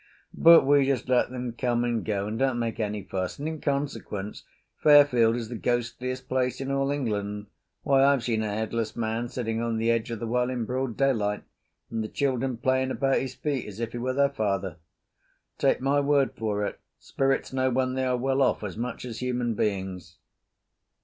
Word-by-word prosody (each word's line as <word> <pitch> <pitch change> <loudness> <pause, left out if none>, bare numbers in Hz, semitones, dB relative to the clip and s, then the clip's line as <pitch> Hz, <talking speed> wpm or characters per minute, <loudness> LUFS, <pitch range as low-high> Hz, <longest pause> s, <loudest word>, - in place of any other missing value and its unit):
But 165 -4 +7
we 140 -1 +4
just 135 -2 0
let 125 -1 +3
them 125 -1 -5
come 120 0 0
and 120 -2 -1
go 100 -2 -1
and 110 +2 -4
don't 135 -2 +1
make 115 -1 -2
any 105 -2 -2
fuss, 95 -1 -4
and 145 - -4
in 160 -1 -5
consequence 125 -8 -3 0.4
Fairfield 140 -6 +6
is 120 -2 -4
the 120 - -5
ghostiest 125 +2 -2
place 130 -1 0
in 135 0 -3
all 135 0 +1
England. 105 -7 -2 0.4
Why, 135 -2 +4
I've 140 -3 +4
seen 115 -3 0
a 110 - -2
headless 110 +1 -2
man 115 +1 -2
sitting 115 -3 -2
on 115 -1 -1
the 115 +1 +2
edge 115 0 0
of 115 -2 -4
the 115 - -4
well 125 +2 0
in 125 -3 -2
broad 130 -1 -3
daylight, 110 -7 +1 0.5
and 115 -1 -2
the - - -4
children 130 -1 -1
playing 130 +2 +1
about 135 +2 +1
his 130 -1 -5
feet 140 -3 -2
as 105 0 -9
if 115 -1 -3
he 120 - -5
were 130 +2 -1
their 140 +1 +3
father. 100 -7 -2 0.8
Take - - +2
my 140 +2 +2
word 140 -1 +2
for 105 -2 -1
it, - - -5 0.2
spirits 135 0 -1
know 130 0 +1
when 130 0 0
they 130 0 -1
are 125 -1 +1
well 135 +2 0
off 130 - +2
as 100 -3 -5
much 120 +2 -4
as 115 -2 -6
human 125 -2 -1
beings. 95 -5 -3
120 Hz, 200 wpm, -27 LUFS, 110-135 Hz, 0.8 s, But